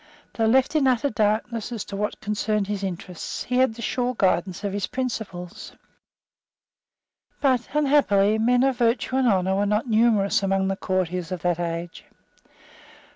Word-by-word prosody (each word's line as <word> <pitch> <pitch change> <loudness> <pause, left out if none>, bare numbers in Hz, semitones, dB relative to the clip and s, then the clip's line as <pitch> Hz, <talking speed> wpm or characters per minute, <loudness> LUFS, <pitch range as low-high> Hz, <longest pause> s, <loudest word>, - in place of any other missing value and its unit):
Though 225 -1 +1
left 260 +6 +3
in 285 -3 +3
utter 255 +2 +1
darkness 215 +2 -1
as 230 -4 -4
to 200 - -7
what 210 +1 -3
concerned 210 0 -1
his 200 0 -4
interests, 180 -2 -5
he 250 - -2
had 255 -3 +3
the 235 - -8
sure 250 +2 -1
guidance 185 0 0
of 200 -1 -2
his 200 -1 -2
principles. 220 -9 -5 1.7
But, 255 -4 +1
unhappily, 220 -9 +3
men 245 +3 +3
of 265 -2 +1
virtue 240 +2 +1
and 265 -1 +2
honour 190 -3 +2
were 205 +1 +1
not 210 +4 +1
numerous 220 -3 +3
among 195 0 0
the 195 - -1
courtiers 180 -2 -2
of 180 -2 -5
that 175 -1 0
age. 170 0 -4
210 Hz, 160 wpm, -24 LUFS, 190-245 Hz, 1.7 s, left